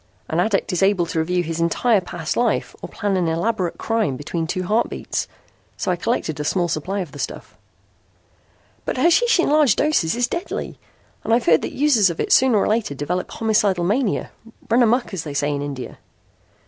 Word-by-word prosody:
An 160 - -1
addict 195 0 0
is 180 - 0
able 195 -3 +3
to 165 -1 -2
review 175 +2 0
his 165 0 -4
entire 195 +6 +2
past 170 -3 -4
life 240 -2 0
or - - -7
plan 205 -3 -2
an 175 -2 0
elaborate 180 +2 -1
crime 220 - -1
between 160 +3 -3
two 185 +2 -2
heartbeats. 215 +6 -1 0.5
So 190 - -1
I - - +1
collected 170 - -2
a - - -1
small 175 +3 0
supply 180 +5 -2
of 170 -6 -6
the 145 - -11
stuff." - - -6 1.3
"But - - -3
hashish 345 - +4
in 345 - +3
large 295 -7 +4
doses 285 - +1
is 245 0 +1
deadly, 345 +7 -5 0.4
and - - -3
I've 235 - 0
heard 160 -2 +5
that - - -5
users 260 -9 +4
of 170 - -5
it - - -2
sooner 255 -4 +5
or - - +2
later 215 -9 0
develop 175 +6 -3
homicidal 210 -5 +1
mania 210 +4 0 0.4
run 240 +2 +5
amuck 240 -1 +2
as 175 -4 -3
they 145 -2 -7
say 145 +1 0
in 140 - -3
India." 140 -3 -6
190 Hz, 195 wpm, -21 LUFS, 165-230 Hz, 1.3 s, heard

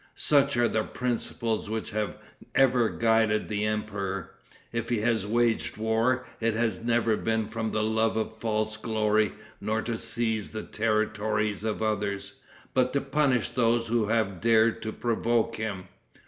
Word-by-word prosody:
Such 140 -3 +3
are 120 0 +4
the 110 - +1
principles 115 -2 -2
which 110 0 -3
have 105 -3 -2 0.4
ever 125 -4 +4
guided 110 -2 +2
the 105 0 0
emperor. 100 -3 -3 0.4
If 115 -1 -2
he 120 -3 +1
has 110 -3 +1
waged 115 0 +1
war, 115 +4 +1
it 115 -1 +1
has 115 0 0
never 115 -1 +2
been 110 0 -1
from 110 0 -3
the 110 - 0
love 110 0 +1
of 110 0 -3
false 110 -1 -1
glory, 110 -1 +1 0.3
nor 110 +1 -1
to 115 -1 -3
seize 115 -2 -1
the 110 - -4
territories 110 -1 0
of 110 0 -2
others, 100 -2 -2 0.4
but 125 0 +2
to 140 - +1
punish 135 -4 +1
those 115 -1 +1
who 115 -2 +1
have 110 -5 0
dared 115 0 +4
to 110 - -3
provoke 115 0 0
him. 105 -4 -3
110 Hz, 155 wpm, -27 LUFS, 110-115 Hz, 0.4 s, are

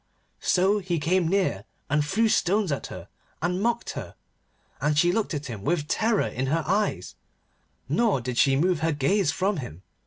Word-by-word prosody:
So 195 +3 +2
he 180 -3 -2
came 175 +3 +1
near 180 - 0 0.2
and 150 +1 +1
threw 215 +10 +1
stones 200 -2 +2
at 140 - -3
her, - - -9 0.3
and 180 +3 -1
mocked 235 +2 0
her, - - -7 0.7
and 150 0 +1
she 175 +3 +4
looked 205 -4 -1
at 145 +1 -4
him 110 -6 -7
with 150 0 0
terror 220 +5 +1
in 130 +2 -3
her 160 +4 0
eyes, 200 +6 -1 0.7
nor 225 - +2
did 125 0 -3
she 135 -1 +4
move 175 +3 +2
her 160 0 +1
gaze 150 +5 +1
from 195 +1 0
him. 95 - -7
175 Hz, 180 wpm, -26 LUFS, 145-200 Hz, 0.7 s, she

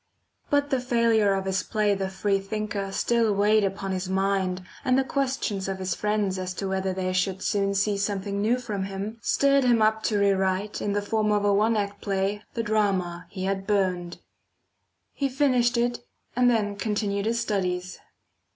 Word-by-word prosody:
But 285 0 +1
the 265 - +2
failure 230 -4 +2
of 195 0 -2
his 190 0 0
play 210 -2 +1
the 195 -1 -2
Free 195 +1 0
thinker 200 0 -4
still 230 0 +1
weighed 210 +1 +3
upon 195 0 -2
his 185 0 -3
mind, 190 -1 0 0.2
and 255 -2 +3
the 270 - +3
questions 260 -8 -2
of 195 -1 -3
his 185 -1 -2
friends 210 -1 -1
as 185 0 -4
to 195 - -3
whether 190 0 -1
they 185 0 -2
should 185 0 -1
soon 200 -1 0
see 200 +1 +1
something 200 0 -2
new 230 +4 +2
from 210 -6 -4
him, 200 +4 -5
stirred 275 +4 +3
him 240 -2 +4
up 220 0 +3
to 210 - +1
re 200 0 +4
write, 190 +2 -1
in 205 - -1
the 205 0 0
form 215 0 0
of 205 -1 +1
a 205 - +4
one 215 +3 +3
act 200 -1 -3
play, 195 +1 -1
the 230 - -1
drama 195 -5 0
he 185 -1 -6
had 195 0 -2
burnt. 185 -4 0 1.0
He 275 -1 -1
finished 250 -3 +2
it, 240 0 0 0.4
and 250 0 +4
then 205 -4 0
continued 205 -1 -1
his 235 +1 +1
studies. 185 -4 -2
200 Hz, 190 wpm, -26 LUFS, 190-220 Hz, 1.0 s, him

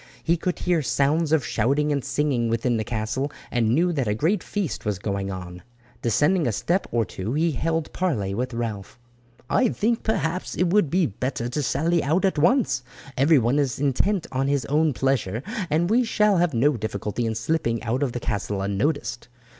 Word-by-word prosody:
He 170 - +2
could 180 +1 -2
hear 175 -3 +1
sounds 145 +5 +1
of 160 -5 +3
shouting 140 +7 +1
and 140 -3 0
singing 135 -6 0
within 115 +1 +1
the 110 - -1
castle, 115 +6 -2 0.2
and 120 -3 +1
knew 170 +9 +2
that 135 -7 -1
a 105 - +1
great 170 - +1
feast 200 -8 -3
was 105 -3 -1
going 100 0 -3
on. 90 -1 -7 0.4
Descending 150 - +2
a - - +1
step 175 - 0
or 115 -2 +1
two 100 +5 -5
he 160 +3 +2
held 160 +3 -2
parley 115 - -1
with 125 +5 -2
Ralph. 110 -4 -4 0.5
"I 255 -3 +3
think, 225 +3 0
perhaps, 185 -5 -1
it 175 -1 +1
will 210 +2 +5
be 175 +2 +1
better 120 +1 -3
to 135 +5 -2
sally 165 +4 +1
out 165 +8 +2
at 190 -5 +1
once. 185 - +3 0.3
Everyone 135 -2 +3
is 135 -5 0
intent 160 +8 +1
on 135 +1 0
his 140 -4 0
own 150 +3 +2
pleasure, 125 -4 0 0.3
and 165 +3 +2
we 235 +6 +3
shall 210 -3 +2
have 170 -5 +1
no 135 +3 +3
difficulty 110 +2 -3
in 110 - -2
slipping 115 -2 -1
out 120 +3 -1
of 140 -4 0
the 120 - -3
castle 100 -2 -2
unnoticed. 115 +4 -1
140 Hz, 190 wpm, -24 LUFS, 115-165 Hz, 0.5 s, will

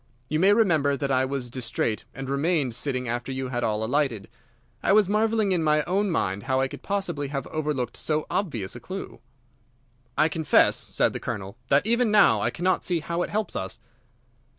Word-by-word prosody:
You 155 - 0
may 190 +4 +5
remember 160 -10 +3
that 140 0 -2
I 130 0 +3
was 130 -3 -4
distrait, 115 -3 -2
and 135 0 -6
remained 140 -1 0
sitting 125 0 -1
after 120 +3 -3
you 130 -1 -3
had 120 -1 -2
all 110 -1 0
alighted. 120 -4 0 0.5
I - - +3
was 210 -2 +5
marvelling 215 0 +1
in 180 -3 +2
my 150 -1 +3
own 195 +4 0
mind 100 - -1
how 130 0 +2
I 135 - +2
could - - -10
possibly 180 -8 -2
have 135 -1 -4
overlooked 150 -6 -3
so 155 -1 -1
obvious 120 - -2
a - - -7
clue." 190 +9 -7 1.0
"I 155 - +5
confess," 160 -2 +3
said - - 0
the - - -4
Colonel, 100 0 -5
"that 140 +6 +3
even 235 +1 +3
now 210 -1 +5
I - - +1
cannot 185 +2 0
see 175 -3 0
how 170 +2 -2
it - - -2
helps 215 0 -2
us." 95 - -4
145 Hz, 195 wpm, -25 LUFS, 125-185 Hz, 1.0 s, may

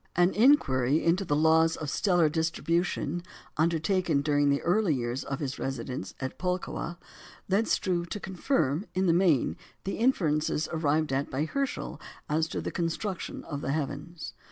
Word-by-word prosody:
An 175 +1 +4
inquiry 155 - +4
into 175 +4 +3
the 145 -6 0
laws 160 +1 +4
of 155 - -5
stellar 175 -5 +3
distribution, 165 +1 -1 0.3
undertaken 165 -1 +1
during 145 -1 +2
the 140 0 +1
early 175 -2 +2
years 120 +1 -2
of 135 - -4
his 140 -2 -4
residence 130 -6 -4
at 130 0 -5
Pulkowa, 180 -1 -3 0.5
led 200 +4 +2
Struve 175 -2 0
to 210 - -4
confirm 185 - -1
in 190 +1 +2
the 170 - +4
main 165 - +3 0.3
the 195 - -3
inferences 160 - +1
arrived 155 -2 +1
at 135 +1 0
by 140 +3 -1
Herschel 275 - -3 0.3
as 160 +1 +1
to - - -4
the - - -4
construction 175 +3 -3
of 145 -2 -5
the 135 - -1
heavens. 155 +3 -4
160 Hz, 155 wpm, -28 LUFS, 145-180 Hz, 0.5 s, An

